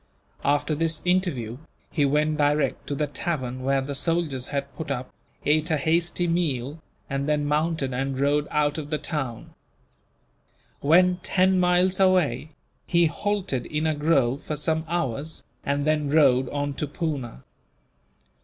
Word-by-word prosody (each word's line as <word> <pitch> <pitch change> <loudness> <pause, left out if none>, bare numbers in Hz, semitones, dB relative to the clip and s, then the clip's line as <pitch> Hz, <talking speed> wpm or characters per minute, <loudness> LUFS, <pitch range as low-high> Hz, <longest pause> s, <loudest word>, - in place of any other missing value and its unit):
After 145 +2 +1
this 160 0 0
interview, 145 - 0 0.3
he 145 -4 +2
went 150 +2 +1
direct 145 -2 +1
to 145 - -2
the 150 - 0
tavern 130 -3 -3
where 135 +1 +1
the 140 +2 -4
soldiers 150 -4 -1
had 140 -1 -4
put 160 -2 -6
up, 130 -2 -3 0.3
ate 155 +2 +2
a 155 - +2
hasty 170 +4 +1
meal, 155 -4 -1 0.3
and 140 +1 -2
then 150 -1 +1
mounted 150 -2 0
and 135 +1 -2
rode 145 +1 +2
out 150 0 +1
of 145 -1 -7
the 155 - 0
town. 135 -8 -4 1.3
When 180 +5 +4
ten 185 +1 +2
miles 180 +1 +3
away, 185 -5 +3 0.4
he 170 -1 +4
halted 180 -7 -1
in 150 +1 -2
a 155 - +2
grove 145 -3 +2
for 155 - -4
some 160 +2 -1
hours, 150 -2 -2 0.2
and 140 0 0
then 155 -2 +1
rode 135 -4 +4
on 145 0 -2
to 150 - -2
Poona. 140 - -4
150 Hz, 150 wpm, -25 LUFS, 140-165 Hz, 1.3 s, When